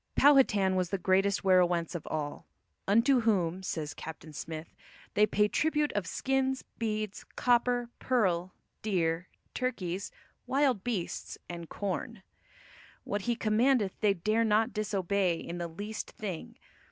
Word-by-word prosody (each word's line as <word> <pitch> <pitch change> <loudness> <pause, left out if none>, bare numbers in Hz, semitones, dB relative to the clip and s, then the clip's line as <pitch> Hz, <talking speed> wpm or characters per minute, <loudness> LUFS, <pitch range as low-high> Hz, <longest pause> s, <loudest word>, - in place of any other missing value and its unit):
Powhatan 220 -10 +5
was 180 -2 0
the 195 - 0
great 190 +1 +3 0.2
werowance 180 -2 +3
over 170 - -5
all, 150 -2 -4 0.4
"unto 230 +6 +5
whom," 190 -6 +1
says 160 -5 -3
Captain 160 -1 -9
Smith, 160 +2 -6 0.4
"they 210 +1 +4
pay 210 0 +3
tribute 300 +5 +1
of 200 -5 -1
skinnes, 265 +5 0 0.2
beads, 215 -2 -2
copper, 245 0 +2
pearle, 185 -8 +1 0.3
deere, 175 -4 0 0.3
turkies, 200 -7 -2 0.4
wild 265 -7 +2
beasts, 215 -8 -3
and 170 -1 -7
corne. 205 +2 -4 0.8
What 205 +3 -3
he 235 - +2
commandeth 225 -1 +2
they 205 -2 +3
dare 215 +6 +1
not 220 0 +2
disobey 200 -3 0
in 170 +1 -6
the 170 - -2
least 205 +6 -6
thing. 190 -6 -6
200 Hz, 130 wpm, -30 LUFS, 175-230 Hz, 0.8 s, Powhatan